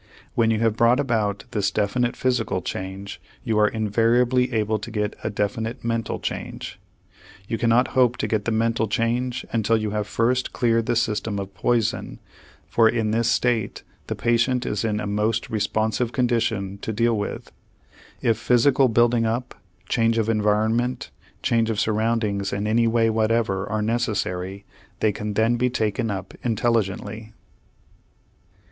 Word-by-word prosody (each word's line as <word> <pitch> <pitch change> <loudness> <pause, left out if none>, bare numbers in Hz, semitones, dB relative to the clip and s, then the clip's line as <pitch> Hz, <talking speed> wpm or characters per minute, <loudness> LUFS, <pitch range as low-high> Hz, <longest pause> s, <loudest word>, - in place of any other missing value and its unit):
When 115 -1 +2
you 110 -1 +1
have 115 -2 +2
brought 120 +3 +4
about 110 -7 0
this 100 -2 +1
definite 115 +5 0
physical 120 -7 0
change, 95 +1 -6 0.2
you 110 -2 +1
are 105 - +5
invariably 120 +4 +2
able 110 -1 0
to 110 - -7
get 105 -2 -2
a - - -1
definite 110 +3 -3
mental 115 -1 -1
change. - - -5 0.7
You 115 - -2
cannot 115 +2 +3
hope 125 -2 +3
to - - -1
get 110 -2 -1
the 115 - 0
mental 115 0 +1
change 120 +4 -1
until 115 0 +2
you 110 -1 -2
have 105 -1 -2
first 125 +4 0
cleared 115 -2 +1
the 120 - +1
system 110 -2 -1
of 100 0 -5
poison, 115 +5 0 0.5
for 115 -1 +4
in 110 -2 0
this 115 +1 +1
state 115 -2 0 0.2
the - - -3
patient 120 +2 +1
is 105 - -2
in 105 -2 0
a 105 - -3
most 105 +2 -1
responsive 110 +2 0
condition 115 -6 0
to 110 - -4
deal 115 +2 +2
with. 105 -1 -4 0.7
If 115 -2 +2
physical 125 +3 +4
building 120 0 +3
up, 120 +3 -2 0.3
change 115 +1 +2
of 110 -1 +1
environment, 110 +3 +1 0.3
change 115 -1 +2
of 110 -2 -1
surroundings 110 -2 0
in 100 +1 -2
any 115 +2 +2
way 115 0 +2
whatever 110 -3 0
are 105 0 -1
necessary, 100 -4 -2 0.3
they 110 - +2
can 105 +1 -5
then 115 +2 +2
be 125 +1 +1
taken 115 -1 -1
up 95 -2 -5
intelligently. 110 -1 -1
115 Hz, 155 wpm, -23 LUFS, 105-120 Hz, 0.7 s, are